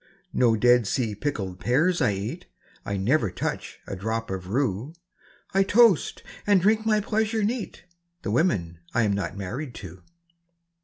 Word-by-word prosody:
No 120 Hz, -3 st, +4 dB
Dead 120 Hz, 0 st, +4 dB
Sea 115 Hz, -3 st, 0 dB
pickled 100 Hz, -7 st, -3 dB
pears 160 Hz, +9 st, +2 dB
I 105 Hz, -, +3 dB
eat; 100 Hz, +2 st, -5 dB, 0.4 s
I 100 Hz, -, -1 dB
never 110 Hz, +3 st, +2 dB
touch -, -, -4 dB
a -, -, -5 dB
drop 110 Hz, +3 st, -3 dB
of 95 Hz, -1 st, -5 dB
rue; 120 Hz, -, -1 dB, 0.6 s
I 195 Hz, -, +4 dB
toast, 205 Hz, -2 st, +4 dB, 0.2 s
and 200 Hz, -2 st, +5 dB
drink 220 Hz, +4 st, +2 dB
my 215 Hz, -1 st, +4 dB
pleasure 220 Hz, +1 st, 0 dB
neat, 225 Hz, +1 st, -3 dB, 0.4 s
The -, -, -2 dB
women 85 Hz, -, +1 dB, 0.2 s
I'm 110 Hz, -4 st, +3 dB
not 100 Hz, 0 st, -3 dB
married 120 Hz, +7 st, -5 dB
to! 90 Hz, -1 st, -10 dB
120 Hz, 150 wpm, -25 LUFS, -, 0.6 s, and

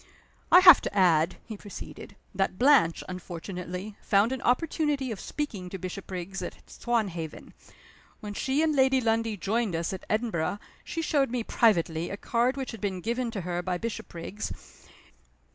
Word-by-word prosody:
"I 360 Hz, -, +9 dB
have 360 Hz, -5 st, +10 dB
to 205 Hz, -, -4 dB
add," 170 Hz, -2 st, +4 dB
he 220 Hz, -, -7 dB
proceeded, 205 Hz, -1 st, -10 dB, 0.2 s
"that 195 Hz, -1 st, -1 dB
Blanche, 255 Hz, -, +4 dB
unfortunately, 180 Hz, +2 st, -6 dB
found 205 Hz, +4 st, +3 dB
an 265 Hz, -, -3 dB
opportunity 285 Hz, 0 st, 0 dB
of 215 Hz, -, -5 dB
speaking 210 Hz, -12 st, -4 dB
to 190 Hz, -, -5 dB
Bishopriggs 185 Hz, +1 st, -6 dB
at -, -, -5 dB
Swanhaven. 195 Hz, -10 st, -3 dB, 0.7 s
When 210 Hz, -1 st, -6 dB
she 270 Hz, +8 st, 0 dB
and 310 Hz, -2 st, +2 dB
Lady 265 Hz, -1 st, +4 dB
Lundie 225 Hz, -2 st, 0 dB
joined 210 Hz, +1 st, 0 dB
us 165 Hz, +3 st, -2 dB
at 190 Hz, -, -8 dB
Edinburgh 215 Hz, -5 st, 0 dB, 0.3 s
she 330 Hz, -, -4 dB
showed 285 Hz, -4 st, +2 dB
me 245 Hz, -1 st, -2 dB
privately 170 Hz, -8 st, +2 dB
a 200 Hz, -, -5 dB
card 245 Hz, +4 st, 0 dB
which 265 Hz, -1 st, -4 dB
had 225 Hz, -, -9 dB
been 195 Hz, -3 st, -2 dB
given 235 Hz, +4 st, -1 dB
to 215 Hz, -4 st, -4 dB
her 175 Hz, 0 st, -2 dB
by 180 Hz, 0 st, -2 dB
Bishopriggs. 210 Hz, -2 st, -7 dB
210 Hz, 160 wpm, -28 LUFS, 180-250 Hz, 0.7 s, have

